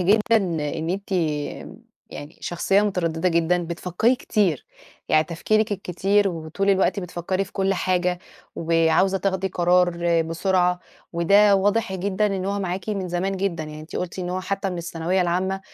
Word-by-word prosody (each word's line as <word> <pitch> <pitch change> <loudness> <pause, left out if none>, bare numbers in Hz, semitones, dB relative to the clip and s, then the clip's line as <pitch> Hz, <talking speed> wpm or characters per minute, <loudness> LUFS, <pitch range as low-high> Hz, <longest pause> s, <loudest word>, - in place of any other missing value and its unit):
جدًا 215 +5 +3
إن 160 -4 -2
أنتِ 200 - -10 1.0
يعني، 145 +2 -9
شخصية 195 +3 +1
متردّدة 180 -4 0
جدًا، 170 +1 +2
بتفكّري 180 +8 0
كتير، 200 - 0 0.4
يعني 155 0 +4
تفكيرِك 215 +6 0
الكتير 195 +2 +1
وطول 170 +4 -2
الوقت 195 +1 +2
بتفكّري 180 +1 -2
في 190 - -17
كلّ 195 0 0
حاجة، 180 -1 0 0.4
وعاوزة 165 +4 +2
تاخدي 190 -1 -1
قرار 175 -1 +2
بسرعة، 180 +2 +1 0.3
وده 200 +5 +5
واضح 205 +1 +1
جدًا 195 +2 0
إن 195 -2 -2
هو 200 +1 -1
معاكِ 185 +1 -4
من 195 -4 -2
زمان 190 +3 -1
جدًا، 180 -5 -2
يعني 155 0 -9
أنتِ 155 - -8
قُلتِ 180 +1 -4
إن 180 -1 -3
هو 185 +1 -2
حتّى 195 0 -2
من 180 - -4
الثانوية 170 +2 -1
العامة، 185 +2 -1
180 Hz, 155 wpm, -23 LUFS, 170-195 Hz, 1.0 s, وده